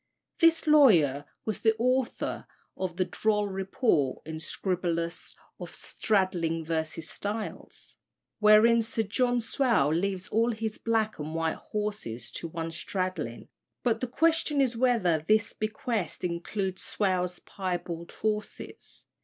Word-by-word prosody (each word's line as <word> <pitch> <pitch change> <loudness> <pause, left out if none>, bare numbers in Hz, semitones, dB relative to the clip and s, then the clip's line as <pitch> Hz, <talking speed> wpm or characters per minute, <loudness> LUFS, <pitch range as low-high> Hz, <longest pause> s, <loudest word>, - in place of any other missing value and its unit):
This 330 0 +4
lawyer 175 - +5 0.2
was 215 - -3
the 220 -1 +4
author 255 +2 0 0.3
of 180 -2 -4
the 185 - +2
droll 210 +1 +1
report 190 - 0
in 160 0 -5
Scriblerus 170 0 -2 0.2
of - - -8
"Stradling 175 -6 0
versus 160 0 -2
Styles," 210 +2 -6 0.4
wherein 215 +2 +6
Sir 225 0 -1
John 245 +4 +1
Swale 230 - +2
leaves 185 +2 -1
all 230 +2 +2
his 220 -1 -4
black 220 -3 0
and 155 +2 -5
white 165 -1 0
horses 205 - -4
to 170 - -4
one 165 0 -4
Stradling, 185 +2 -3 0.4
but 230 -2 +1
the 255 - -1
question 320 +2 +2
is 255 -3 +2
whether 225 -11 +2
this 215 0 +3
bequest 215 - -3
includes 185 +2 -2
Swale's 180 -3 0
piebald 175 -3 -5
horses. 210 -1 -4
200 Hz, 125 wpm, -28 LUFS, 170-225 Hz, 0.4 s, wherein